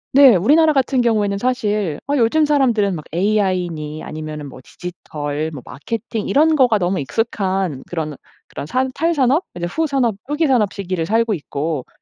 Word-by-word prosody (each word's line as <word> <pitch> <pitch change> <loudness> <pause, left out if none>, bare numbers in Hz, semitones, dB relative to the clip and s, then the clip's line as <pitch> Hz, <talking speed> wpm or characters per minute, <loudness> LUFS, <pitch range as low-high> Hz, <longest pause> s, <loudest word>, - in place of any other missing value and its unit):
네. 270 -5 +8
우리나라 300 - +4
같은 265 -2 +2
경우에는 210 -4 +1
사실 210 - -1
어 285 - 0
요즘 270 +6 +3
사람들은 240 -9 +2
막 155 - -7
AI니 180 -6 -1
아니면은 155 -1 -6
뭐 130 - -11
디지털 155 -3 -5
뭐 140 -5 -9
마케팅 215 - -5
이런 315 +3 +4
거가 250 -6 +4
너무 185 -2 0
익숙한 190 - -1
그런 155 -3 -3 0.3
그런 145 - -7
산 260 +7 0
탈산업 310 0 +2
이제 175 -1 -3
후산업, 270 - 0
후기 295 +3 0
산업 240 -8 +2
시기를 185 -5 -3
살고 225 +2 +2
있고 150 -4 -3
205 Hz, 345 characters per minute, -19 LUFS, 165-260 Hz, 0.3 s, 네